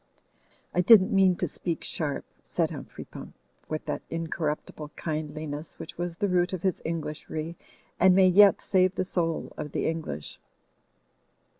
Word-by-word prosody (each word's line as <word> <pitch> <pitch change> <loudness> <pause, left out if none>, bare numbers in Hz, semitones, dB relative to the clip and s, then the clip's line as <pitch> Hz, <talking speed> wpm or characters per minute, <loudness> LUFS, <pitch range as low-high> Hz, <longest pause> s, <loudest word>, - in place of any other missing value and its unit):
"I 180 - +3
didn't 200 +2 +7
mean 190 -2 +5
to - - -1
speak 170 -2 -4
sharp," 150 -4 -3 0.2
said - - -1
Humphrey - - -8
Pump - - -10 0.3
with 155 0 -3
that - - -3
incorruptible 155 -2 -3
kindliness 155 -1 -4
which 165 - -8
was 175 -1 -3
the 205 - 0
root 180 0 +2
of 180 - -4
his 190 -3 0
Englishry, 160 0 -4 0.4
and 185 0 +6
may 190 -1 +7
yet 200 +2 +7
save 185 -1 +2
the 185 - 0
soul 165 -3 -2
of 150 - -5
the - - -1
English. 155 - -4
165 Hz, 150 wpm, -27 LUFS, 155-185 Hz, 0.4 s, didn't